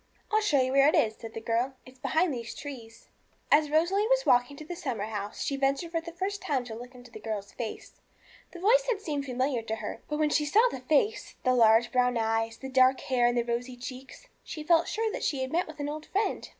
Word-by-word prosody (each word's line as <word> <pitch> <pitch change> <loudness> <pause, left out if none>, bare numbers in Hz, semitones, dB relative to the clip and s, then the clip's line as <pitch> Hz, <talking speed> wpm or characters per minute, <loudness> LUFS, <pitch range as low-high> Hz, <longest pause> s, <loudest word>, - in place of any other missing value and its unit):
'I'll 435 0 +3
show 300 -10 +3
you 260 0 +1
where 275 +1 +5
it 305 - +4
is,' 220 -1 +2
said 225 -1 -10
the - - -3
girl; 235 +4 -1
'it's 255 0 -16
behind 320 +4 +1
these 235 -2 -6
trees.' 235 -6 -9 0.4
As 300 0 +5
Rosalie 350 +7 +2
was - - +2
walking 245 +3 +3
to 310 - -9
the 350 - -6
summer 255 - -3
house, 210 -1 -4
she 280 - -1
ventured 275 +5 0
for 330 -1 -1
the 335 +1 -8
first 380 +4 -3
time 270 -4 -1
to 240 -2 -8
look 245 +3 -10
into 245 -1 -14
the 215 - -9
girl's 210 -2 -5
face. 230 -3 -7 0.5
The 350 - -10
voice - - +4
had 450 -5 +1
seemed 295 -7 -3
familiar 255 -1 -1
to 220 0 -3
her; 225 - -6
but 300 - -1
when 305 -1 +1
she 300 - +2
saw 435 +11 +4
the - - -5
face, 310 - 0
the 255 - +3
large 230 0 +5
brown 250 -1 +2
eyes, 225 0 0
the 265 - -7
dark 260 0 +4
hair, 245 -2 +2
and 240 0 +1
the 240 - +2
rosy 245 +1 -3
cheeks, 255 - -9 0.2
she 310 - -7
felt 335 +1 +3
sure 445 0 -1
that - - -5
she 275 -4 0
had 260 - -5
met 350 +3 +1
with 315 -1 -11
an 290 - -2
old 305 +1 -6
friend. 410 +3 -1
265 Hz, 245 wpm, -28 LUFS, 240-320 Hz, 0.5 s, where